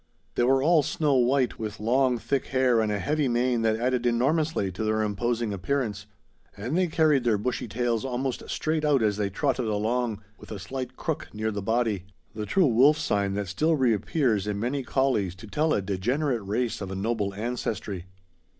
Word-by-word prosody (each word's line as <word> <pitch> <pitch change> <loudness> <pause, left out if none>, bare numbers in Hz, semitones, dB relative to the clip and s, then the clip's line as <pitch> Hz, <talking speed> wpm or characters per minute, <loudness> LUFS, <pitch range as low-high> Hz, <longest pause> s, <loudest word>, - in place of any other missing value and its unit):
They - - 0
were 130 +2 +3
all 165 0 +5
snow 150 0 0
white, 130 0 +2
with 110 -1 -5
long 125 +3 +2
thick 120 +5 -2
hair 130 -3 +3
and 110 -1 0
a 105 - 0
heavy 150 +6 0
mane 120 0 +1
that 110 -1 +2
added 125 +1 0
enormously 135 - +1
to 90 +5 -4
their 110 0 +1
imposing 110 +2 -1
appearance; 105 0 -2 0.5
and 120 +9 -3
they 185 0 +2
carried 155 -4 +3
their 115 -3 +2
bushy 120 +3 -2
tails 115 +1 -1
almost 130 0 -2
straight 155 0 -1
out 145 -5 +3
as 105 -2 +1
they 100 -2 0
trotted 130 +3 -1
along, 110 +1 -1 0.2
with - - -13
a 105 - -4
slight 130 +6 -6
crook 160 -3 -3
near 110 +1 -1
the 100 -1 -4
body, 110 -3 0 0.3
the 105 0 -5
true 190 -2 +3
wolf 135 +4 +5
sign 100 -10 0
that 100 -1 -2
still 155 - +1
reappears 115 - +1
in 105 -1 -2
many 125 +5 -1
collies 125 -9 0
to 95 - -11
tell 155 +8 0
a 100 - +1
degenerate 120 +7 -1
race 110 +4 -2
of 95 - -4
a 95 - -4
noble 100 -1 -1
ancestry. 105 -4 -3
120 Hz, 190 wpm, -26 LUFS, 105-135 Hz, 0.5 s, all